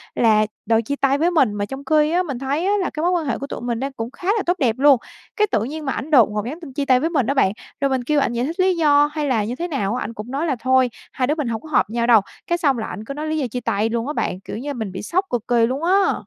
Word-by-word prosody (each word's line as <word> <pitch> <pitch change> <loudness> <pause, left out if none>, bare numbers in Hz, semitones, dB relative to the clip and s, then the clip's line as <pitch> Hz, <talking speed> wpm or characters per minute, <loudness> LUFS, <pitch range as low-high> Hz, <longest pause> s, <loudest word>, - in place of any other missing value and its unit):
là 215 -2 +4 0.2
đòi 225 0 +3
chia 280 +5 -3
tay 275 0 +2
với 335 +4 +2
mình, 270 -11 +3
mà 205 0 -2
trong 270 +5 -8
khi 305 +1 +3
á, 360 +2 +2
mình 275 -7 -5
thấy 280 +6 -1
á 405 - +2
là 365 - -1
cái 305 - -5
mối 355 - +2
quan 345 -3 0
hệ 270 - -1
của 275 - -6
tụi - - -6
mình 240 -1 -2
đang 275 +2 -3
cũng 230 -2 -5
khá 355 - -9
là 410 - -1
tốt 355 +1 +1
đẹp 240 -7 +2
luôn. 280 -1 +6 0.4
Cái 425 - +2
tự 210 - +1
nhiên 300 +5 -5
mà 270 - -1
ảnh 310 - -5
đột 250 -8 +6
ngột 210 0 -2
nhắn 295 +8 -5
tin 290 -6 -10
chia 285 0 -2
tay 255 -1 +4
với 320 - 0
mình 275 -9 0
á 275 - +2
bạn, 230 -9 +3 0.3
rồi 275 - +2
mình 260 -2 0
kêu 295 +3 +1
ảnh 240 - 0
giải 240 +1 -1
thích 330 +6 -5
lý 370 0 +3
do 295 -2 +4
hay 305 -1 -2
là 235 -6 +1
như 230 +4 -3
thế 345 +6 -3
nào 230 - -1
á, 255 - -2
ảnh 230 - -6
cũng 225 +2 -8
nói 285 +5 -1
là 280 - +1
"Thôi, 260 +1 +3 0.2
hai 255 - 0
đứa 300 - +1
mình 295 -5 -2
hổng 225 -2 -3
có 310 - -12
hợp 255 - +2
nhau 235 +1 -1
đâu." 230 -3 +7 0.3
Cái 345 - +1
xong 285 -7 +2
là 220 - -3
ảnh 215 - -7
cứ 275 - -5
nói 300 +2 -5
lý 315 0 -1
do 280 -4 -1
chia 245 +2 -4
tay 220 -1 0
luôn 230 +2 -2
á 295 - -2
bạn, 185 - -2
kiểu 195 - -7
như 285 +5 -4
mình 220 -7 -4
bị 185 - -6
sốc 370 - 0
cực 240 -2 -3
kỳ 235 -2 +3
luôn 260 +6 -3
á! 380 +3 +3
270 Hz, 340 wpm, -21 LUFS, 235-310 Hz, 0.4 s, đâu